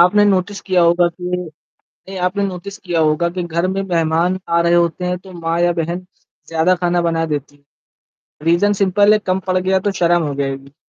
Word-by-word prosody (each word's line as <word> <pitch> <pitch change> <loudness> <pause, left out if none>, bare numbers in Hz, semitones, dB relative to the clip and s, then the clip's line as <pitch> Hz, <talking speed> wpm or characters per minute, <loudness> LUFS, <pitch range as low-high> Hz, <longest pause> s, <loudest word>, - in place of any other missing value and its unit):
आपने 195 +4 +5
नोटिस 200 0 0
किया 185 -3 +1
होगा 175 +1 +4
कि 180 +1 -11
नहीं 180 -3 -6 0.6
आपने 200 +2 -2
नोटिस 195 +2 -7
किया 175 -5 -2
होगा 155 +3 +1
कि 180 - -1
घर 170 +1 -1
में 190 +1 -1
मेहमान 170 0 0
आ 170 0 +3
रहे 170 0 +2
होते 175 +1 +1
हैं। 180 0 -1
तो 190 +1 -14
माँ 165 0 -1
या 175 0 +3
बहन 170 +3 -3 0.4
ज़्यादा 165 +3 +2
खाना 175 0 +2
बना 165 0 0
देती 145 0 -5
हैं 145 - -29 0.8
रीज़न 175 +5 +3
सिंपल 205 +2 +4
है 215 - +4
कम 185 - +2
पड़ 185 0 +1
गया 190 +1 +1
तो - - 0
शर्म 175 0 +3
हो 145 - -3
जाएगी। 135 0 -4
175 Hz, 205 wpm, -18 LUFS, 165-185 Hz, 0.8 s, आपने